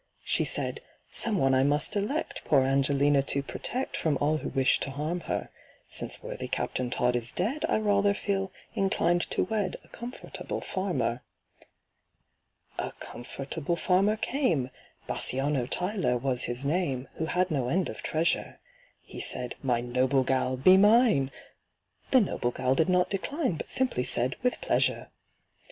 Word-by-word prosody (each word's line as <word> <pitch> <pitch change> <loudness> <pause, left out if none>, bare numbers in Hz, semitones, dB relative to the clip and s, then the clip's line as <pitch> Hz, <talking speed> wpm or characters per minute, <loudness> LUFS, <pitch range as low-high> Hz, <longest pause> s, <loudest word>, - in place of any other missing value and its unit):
She - - +3
said, - - -1 0.3
"Some 220 -3 +3
one 135 -5 +3
I 130 - +4
must 145 +8 +2
elect 210 +10 -2
Poor 140 -3 +4
ANGELINA 140 +1 +3
to 140 0 -1
protect 255 - -3
From 155 -4 0
all 150 +2 +2
who - - -4
wish 135 -1 +2
to - - -2
harm 150 +6 -3
her. - - -2 0.4
Since - - 0
worthy - - -5
CAPTAIN 125 -1 -2
TODD 125 0 +1
is 120 0 -2
dead, 245 +12 -1
I - - +3
rather 205 -1 +2
feel 195 -2 -2 0.2
inclined 175 -3 +1
to - - +1
wed 205 -1 -2
A - - -19
comfortable 240 +2 -6
farmer." 135 - -2 1.6
A - - -3
comfortable 140 +6 -5
farmer 195 +4 +2
came 175 - 0 0.3
(BASSANIO 135 -1 0
TYLER 180 - 0
was 125 0 -1
his 120 +3 -3
name), 140 -5 -1
Who 160 - -1
had 180 +1 0
no 130 -5 0
end 180 +5 +1
of - - -7
treasure. 160 +2 -1 0.4
He - - -8
said, 125 -1 -3
"My 125 -3 +1
noble 130 +2 +1
gal, 130 0 0
be 185 +9 +7
mine!" 210 - +5 0.8
The 260 - +6
noble 150 - -1
gal 130 +1 0
did 160 +6 +2
not 180 0 +2
decline, 260 - -1
But - - -7
simply 255 - +1
said, 125 +2 +2
"With 250 0 0
pleasure." - - 0
155 Hz, 155 wpm, -28 LUFS, 130-195 Hz, 1.6 s, be